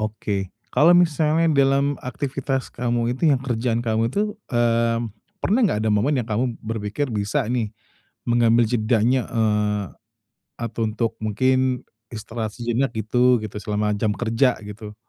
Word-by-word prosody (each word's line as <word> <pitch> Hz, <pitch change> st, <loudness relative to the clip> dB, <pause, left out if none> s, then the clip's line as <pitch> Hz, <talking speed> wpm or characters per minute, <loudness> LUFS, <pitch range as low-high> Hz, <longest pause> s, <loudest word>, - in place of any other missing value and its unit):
Oke. 105 Hz, -3 st, -3 dB, 0.2 s
Kalau 165 Hz, +4 st, +6 dB
misalnya 160 Hz, -1 st, +3 dB
dalam 140 Hz, +1 st, +3 dB
aktivitas 135 Hz, 0 st, -3 dB
kamu, 120 Hz, 0 st, 0 dB
itu 155 Hz, +3 st, +2 dB
yang 135 Hz, -, +3 dB
kerjaan 120 Hz, -2 st, -1 dB
kamu 115 Hz, 0 st, 0 dB
itu, 210 Hz, +3 st, -1 dB, 0.2 s
eee, 115 Hz, -1 st, +2 dB, 0.4 s
pernah 220 Hz, +7 st, +1 dB
nggak 185 Hz, -, +2 dB
ada -, -, +2 dB
momen 130 Hz, +7 st, +2 dB
yang 115 Hz, -, -2 dB
kamu 115 Hz, +2 st, -1 dB
berpikir, 110 Hz, +5 st, -3 dB
bisa 105 Hz, +5 st, -1 dB
nih, 115 Hz, -3 st, -1 dB, 0.6 s
mengambil 120 Hz, 0 st, +4 dB
jedanya, 115 Hz, +2 st, +2 dB
eee, 105 Hz, -2 st, +1 dB, 0.7 s
atau 115 Hz, -1 st, -2 dB
untuk 115 Hz, +1 st, -2 dB
mungkin 130 Hz, +4 st, +1 dB, 0.3 s
istirahat 110 Hz, 0 st, -5 dB
sejenak 120 Hz, +3 st, -1 dB
gitu 125 Hz, +2 st, +2 dB
gitu 105 Hz, -1 st, -7 dB
selama 105 Hz, 0 st, -1 dB
jam 105 Hz, -1 st, +1 dB
kerja, 120 Hz, +3 st, +1 dB
gitu, 105 Hz, +1 st, -9 dB
115 Hz, 140 wpm, -22 LUFS, 110-130 Hz, 0.7 s, Kalau